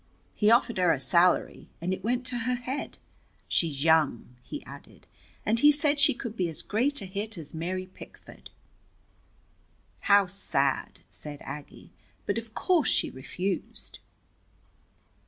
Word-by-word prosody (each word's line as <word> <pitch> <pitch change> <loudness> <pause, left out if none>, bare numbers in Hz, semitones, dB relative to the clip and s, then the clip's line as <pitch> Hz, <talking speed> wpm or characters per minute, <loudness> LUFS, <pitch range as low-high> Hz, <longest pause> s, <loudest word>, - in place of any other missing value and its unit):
He 210 - +3
offered 235 -2 +4
her 180 -2 +5
a - - +1
salary, 175 +6 +2
and 180 +3 -1
it 190 - -5
went 245 +3 0
to 245 -1 -1
her 250 +2 0
head. 250 +3 -5 0.5
She's 150 -5 0
young," 155 -7 +2
he 295 - -8
added, - - -13 0.4
"and 225 +2 +2
he 295 +4 +8
said 295 0 +2
she 280 - +5
could 235 -2 -6
be 180 -5 0
as 160 - -6
great 260 +6 0
a - - -5
hit 200 +2 -4
as 155 -3 -9
Mary 180 +3 -3
Pickford." 185 - -8 1.5
"How 200 -1 +5
sad!" 140 -8 -1
said 145 -1 -7
Aggie. 145 +1 -9 0.3
"But - - 0
of 225 -1 -12
course 355 -6 +2
she - - +1
refused?" 180 +8 -4
195 Hz, 145 wpm, -28 LUFS, 165-240 Hz, 1.5 s, he